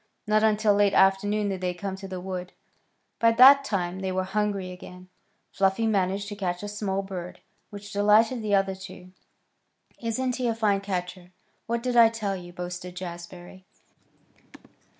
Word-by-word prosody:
Not 215 0 +2
until 215 -1 +3
late 200 -1 +2
afternoon 205 +2 +3
did 190 -2 -4
they 180 -1 -2
come 190 +1 -5
to 195 0 -8
the 185 -1 -6
wood. 180 -1 -6 0.7
By 230 0 +4
that 270 +4 +8
time 185 -7 -2
they 190 -1 -3
were 185 0 -1
hungry 200 -1 -2
again. 180 0 -12 0.4
Fluffy 195 +3 +1
managed 200 -1 0
to 205 - -6
catch 180 -2 -3
a - - -4
small 205 -1 -3
bird, 180 -2 -7 0.3
which 205 0 -10
delighted 215 +4 +3
the 210 -2 +1
other 195 -1 +1
two. 185 -1 -11 0.9
"Isn't 250 +2 -2
he 250 -2 -1
a 230 - 0
fine 205 -3 +1
catcher? 180 -2 -5 0.4
What 235 0 -2
did 250 -1 -1
I 230 -1 +7
tell 215 -3 -3
you?" 175 -1 -9
boasted 180 0 -7
Jazbury. 175 +1 -9
195 Hz, 165 wpm, -26 LUFS, 185-215 Hz, 0.9 s, that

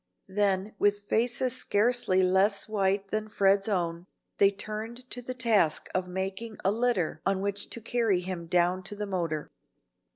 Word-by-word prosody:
Then 200 0 +1
with 205 0 +2
faces 240 +2 +1
scarcely 205 -3 +2
less 190 +2 +3
white 195 -2 0
than 215 0 -1
Fred's 195 -1 +2
own, 175 -2 -1 0.3
they 200 - +7
turned 215 +5 -6
to 245 - -6
the 255 +1 -6
task 220 -11 +2
of 185 0 -1
making 190 +4 -4
a 195 - +4
litter 215 -9 0
on 195 0 +1
which 200 +1 -2
to - - -5
carry 225 -5 +1
him 180 -2 -5
down 180 +2 +2
to 205 - -5
the 210 0 -3
motor. 170 -6 -3
200 Hz, 160 wpm, -28 LUFS, 185-215 Hz, 0.3 s, they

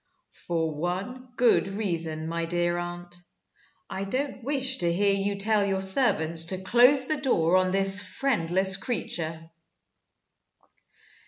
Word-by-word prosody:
"For 165 -2 -1
one 190 +11 -5
good 240 -5 +3
reason, 165 -6 -3
my 165 0 -3
dear 175 0 -1
aunt. 175 0 -7 0.7
I 190 - -5
don't 255 +5 -4
wish 265 -1 -2
to 170 -2 +1
hear 200 +3 +1
you 200 +1 -1
tell 210 +1 +2
your 195 -1 -1
servants 170 - +3
to 185 +3 0
close 250 +6 +4
the 310 +3 -2
door 175 - +1
on 185 0 +2
this 195 +1 +4
friendless 190 -4 0
creature." 165 -7 -4
190 Hz, 130 wpm, -26 LUFS, 170-220 Hz, 0.7 s, close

